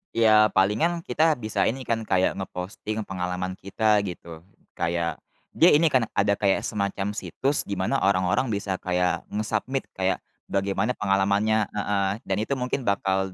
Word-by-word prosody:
Iya 110 -2 +6
palingan 120 - +2
kita 160 -1 +2
bisa 110 -5 -1
ini 130 +3 -2
kan 115 -1 -1
kayak 95 0 +2
nge-posting 100 +4 -5
pengalaman 90 0 -4
kita 105 +2 +2
gitu. 85 -2 -8 0.4
Kayak 85 0 -1 0.3
dia 170 - +5
ini 160 +1 +4
kan 130 -4 +3
ada 100 0 +3
kayak 100 -2 +2
semacam 100 -1 -2
situs 135 +6 -1
di 100 - -3
mana 95 +9 0
orang-orang 95 +6 +2
bisa 100 -3 -2
kayak 90 -1 0
nge-submit 115 +5 -2
kayak, 95 0 -1 0.2
bagaimana 100 +4 0
pengalamannya 100 +2 +1
heeh. 100 -1 0
Dan 95 0 -2
itu 110 +6 -1
mungkin 125 -1 -3
bakal 95 -1 0
100 Hz, 150 wpm, -25 LUFS, 95-110 Hz, 0.4 s, Iya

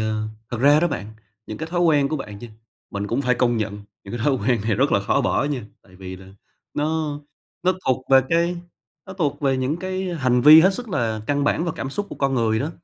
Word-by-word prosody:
à, 110 0 -1 0.3
thật 120 - -3
ra 145 +3 +5
đó 175 - +2
bạn, 110 -8 -5 0.3
những 110 - -7
cái 160 - -5
thói 175 0 0
quen 150 -5 +3
của 155 - -2
bạn 105 -8 -8
chư 120 - -9 0.4
mình 100 0 -4
cũng 120 +6 -1
phải 125 -1 +2
công 120 -1 +1
nhận 105 -1 -3 0.3
những 100 - -7
cái - - -6
thói 145 - +3
quen 120 -1 0
này 110 0 0
rất 135 +7 +1
là 100 - +3
khó 100 - +1
bỏ - - +1
nha, 140 -6 -3 0.2
tại 90 -1 -20
vì 95 0 -8
là 95 0 -14 0.5
nó 150 -1 -1 0.4
nó 185 +1 +3
thuộc 130 0 0
về 135 0 +8
cái 170 +1 +1 0.5
nó 190 - -8
thuộc 150 -6 -2
về 135 -2 +1
những 130 +4 -1
cái 185 0 -3
hành 130 -5 +1
vi 150 +5 +9
hết 190 +3 +4
sức 245 +3 -6
là 115 - -1
căn 145 +1 0
bản 160 +3 +1
và 170 - -2
cảm 135 - -4
xúc 205 +8 -3
của - - -7
con 135 -1 0
người 110 -3 +1
đó, 140 +7 -2
135 Hz, 250 wpm, -22 LUFS, 115-160 Hz, 0.5 s, vi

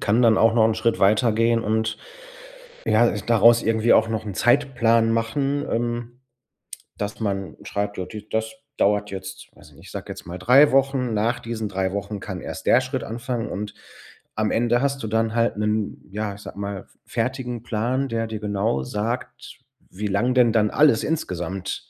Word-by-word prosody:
kann 110 +4 +2
dann 115 -1 +5
auch 115 0 +4
noch 110 -2 +5
'n 110 - +1
Schritt 115 +1 0
weitergehen 115 +3 +3
und, 110 +1 0 0.9
ja, 115 +2 +4
äh, 105 - -2
daraus 115 0 +5
irgendwie 110 +1 +2
auch 110 - +4
noch 110 -1 -3
'n 100 - -5
Zeitplan 120 -3 +3
machen, 135 +5 -1
ähm, 120 +1 -3 0.8
dass 105 +2 -4
man 100 -3 -3
schreibt: 100 0 -3
„Ja, 90 - -3
d 105 +2 -10
das 110 +2 -2 0.2
dauert 105 0 +1
jetzt 95 0 -8
weiß - - -17
ich - - -21
nicht, - - -16
ich - - -12
sage - - -6
jetzt - - -8
mal 90 +2 -7
3 130 +9 +6
Wochen. 135 -3 +2
Nach 115 +3 0
diesen 115 -2 -4
3 95 -1 -1
Wochen 100 0 -4
kann 95 -2 -6
erst - - -7
der 125 - +6
Schritt 130 -1 -4
anfangen.“ 120 0 -4
Und 105 +1 -5 0.6
am 110 -1 0
Ende 120 +1 +2
hast 140 -1 -1
du - - -2
dann 110 +1 0
halt 115 -2 +1
'nen, 105 0 -2
ja, 105 0 -3
ich 100 - -13
sage 100 - -10
mal, 100 -1 -4
f - - -24
fertigen 125 -3 -3
Plan, 120 +4 -1
der 115 -1 -2
dir 110 -1 -5
genau 100 -9 -1
sagt, 110 - -5 0.3
wie 105 +3 -4
lang 115 +6 +1
denn 120 -3 +5
dann 105 -2 +3
alles 145 -6 +4
insgesamt 95 - -4
110 Hz, 190 wpm, -23 LUFS, 105-120 Hz, 0.9 s, 3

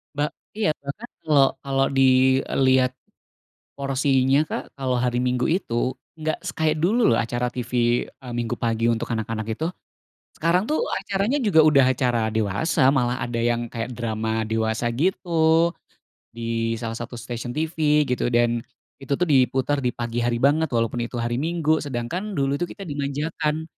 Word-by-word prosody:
Ba 145 +1 +1 0.2
iya, 205 -8 0
bahkan 145 +12 -6 0.2
kalo 140 -3 +4
kalo 135 -1 0
dilihat 130 0 +3 0.8
porsinya 135 +1 +2
Kak, - - -5
kalau 130 -2 0
hari 125 0 0
Minggu 125 +1 0
itu, 130 -7 -1 0.2
nggak 155 -1 -2
se - - -3
kayak 155 -1 +1
dulu 215 +9 +3
loh 115 - +3
acara 120 +1 -1
TV, 120 -1 0
eee, 125 -2 -12
Minggu 115 -2 -1
pagi 115 -1 -1
untuk 115 0 0
anak-anak 110 -1 -3
itu. 135 +9 -2 0.7
Sekarang 170 +3 +1
tuh 310 - +1
acaranya 200 +6 -1
juga 190 -7 +4
udah 140 -3 +6
acara 120 -4 0
dewasa, 110 - +1
malah 125 -1 +1
ada 120 -1 -3
yang 120 0 0
kayak 115 +2 -5
drama 110 -1 -2
dewasa 110 +1 0
gitu, 165 +1 +2 0.6
di 115 0 -1
salah 115 0 -5
satu 120 +1 -6
stasiun 120 +2 -6
TV 155 -2 +2
gitu, 125 -2 -1
dan, 120 -1 +2 0.4
itu 140 0 -1
tuh 180 - +1
diputer 135 -1 +2
di 125 -2 -2
pagi 120 0 -2
hari 120 0 +1
banget 145 +6 +2
walaupun 115 0 -1
itu 120 +1 -4
hari 120 +2 -1
Minggu. 160 -1 +1
Sedangkan, 150 - -4
dulu 140 0 0
itu 175 - -1
kita 195 - -9
dimanjakan. 150 +1 -2
130 Hz, 155 wpm, -23 LUFS, 120-155 Hz, 0.8 s, udah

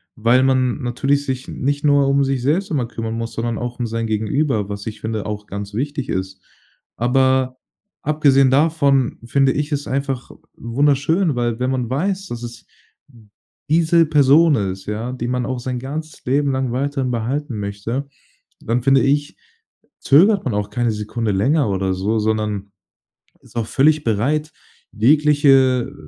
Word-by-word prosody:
weil 120 +3 +3
man 130 0 +1
natürlich 135 +3 0
sich 130 -1 -4
nicht 145 +2 -2
nur 145 -1 +4
um 140 0 +3
sich 135 -2 -1
selbst 175 +10 0
immer 130 -6 0
kümmern 115 -1 -5
muss, 115 0 -4
sondern 115 0 -2
auch 120 0 -5
um 120 - -1
sein 115 0 -3
Gegenüber, 110 +1 0
was 100 +1 -6
ich 110 - -6
finde, 110 -2 -3
auch 105 0 -5
ganz 100 0 -6
wichtig 140 +3 -3
ist. 95 0 -4 0.6
Aber, 130 +1 +2 0.4
abgesehen 140 -3 +3
davon, 140 -2 +2
finde 135 +2 +2
ich 150 +2 -2
es 145 -1 -2
einfach 135 -1 -3 0.2
wunderschön, 145 +7 +1
weil 120 -1 -1
wenn 125 +1 0
man 125 -3 -2
weiß, 190 +8 -2
dass 120 -7 -7
es 120 -1 -9 1.0
diese 165 +1 +4
Person 150 +1 +5
ist, 95 -3 -3
ja, 110 +4 -3
die 120 -2 -4
man 125 0 -1
auch 130 -1 -3
sein 125 0 -4
ganzes 150 +4 -7
Leben 140 +2 +1
lang 130 -2 -1
weiterhin 135 0 -1
behalten 120 +1 -3
möchte, 105 +7 -4 0.5
dann 120 +2 -1
finde 135 0 +4
ich, 145 +1 0 0.6
zögert 190 +8 +4
man 125 - -1
auch 105 0 -2
keine 120 -2 0
Sekunde 105 +1 -3
länger 130 +7 +1
oder 95 -1 -1
so, 100 +4 -1
sondern 105 -2 -2 0.7
ist - - -19
auch 115 -2 -1
völlig 150 +5 +2
bereit, 140 +8 0 0.4
jegliche, 135 -1 +3
äh, - - -15
130 Hz, 160 wpm, -20 LUFS, 115-145 Hz, 1.0 s, Person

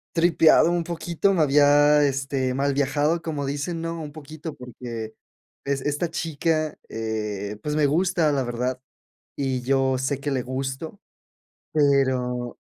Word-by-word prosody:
tripeado 165 0 +5
un 175 -1 0
poquito, 170 +3 0
me 175 - +2
había, 145 +1 +5
este, 135 -1 -1
mal 140 +1 +1
viajado, 145 +4 +1
como 150 -4 -3
dicen, 145 +5 -3
¿no? 165 0 -4
Un 150 -2 -7
poquito, 155 +1 -8
porque, 120 -3 -7 0.5
es 140 -1 -1
esta 150 +4 -1
chica, 155 0 -1
eh, 105 -2 -4
pues, 150 0 -2
me 150 -1 +3
gusta 165 0 +2
la 135 -2 +1
verdad, 125 +1 -2 0.6
y 130 -2 -1
yo 135 +1 +1
sé 130 +2 -1
que 145 +1 -3
le 130 -2 0
gusto, 135 +8 -5 0.7
pero 130 -4 +1
140 Hz, 140 wpm, -24 LUFS, 130-155 Hz, 0.7 s, tripeado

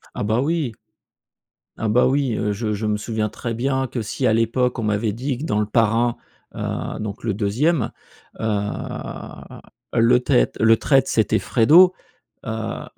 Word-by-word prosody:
Ah, - - -3
bah, 110 +4 +1
oui 155 -3 0 1.1
ah 115 - -2
bah, 120 +4 +4
oui, 135 -3 +1
heu, 105 0 -1
je 105 +1 -2
je 105 +1 -3
me 105 0 0
souviens 110 0 -2
très 120 +2 -5
bien 130 +3 -1
que 120 - -4
si 120 +5 -2
à 110 - +3
l'époque 120 +3 +1
on 115 - -3
m'avait 105 0 0
dit 130 +3 -3
que 140 - -7
dans 105 -8 0
Le 105 - +1
Parrain, 115 +2 +1 0.4
heu, - - -4
donc 105 -1 -6
le 110 -3 0
2e, 115 - 0 0.5
heu, 110 - -1 1.4
le 115 +2 +4
traitre - - +1
le 110 +1 +5
traitre 135 +2 +2
c'était 110 -2 +2
Fredo, 165 +10 +5 0.5
heu, 110 -1 -4
115 Hz, 165 wpm, -21 LUFS, 110-130 Hz, 1.4 s, le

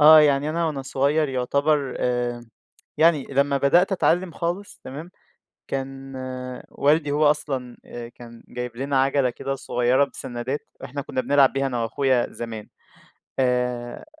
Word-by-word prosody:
آه. 155 +1 +10
يعني 145 0 +3
أنا 165 +1 0
وأنا 145 -4 -3
صغير 140 +3 +1
يعتبر 140 +2 +1
آآ 120 -1 -1 0.5
يعني 160 -4 +4
لمّا 140 +1 +2
بدأت 170 +8 +4
أتعلّم 180 -1 +2
خالص 175 +5 -4
تمام؟ 155 +7 -8 0.6
كان 135 0 -5 0.5
والدي 150 0 +2
هو 145 0 +4
أصلًا 130 -5 -4
أ 120 -1 -7
كان 115 -1 -13
جايب 125 -1 -6
لنا 135 0 +1
عَجَلة 135 -1 +2
كده 135 +3 -4
صغيرة 125 +1 +2
بسنّادات، 125 +1 -4 0.2
إحنا 140 +3 -4
كُنّا 130 - -2
بنلعب 140 0 +4
بيها 135 0 0
أنا 125 -3 -2
وأخويا 125 +2 +1
زمان. 115 -3 -7 0.7
آآ 125 -1 0
135 Hz, 140 wpm, -24 LUFS, 125-150 Hz, 0.7 s, آه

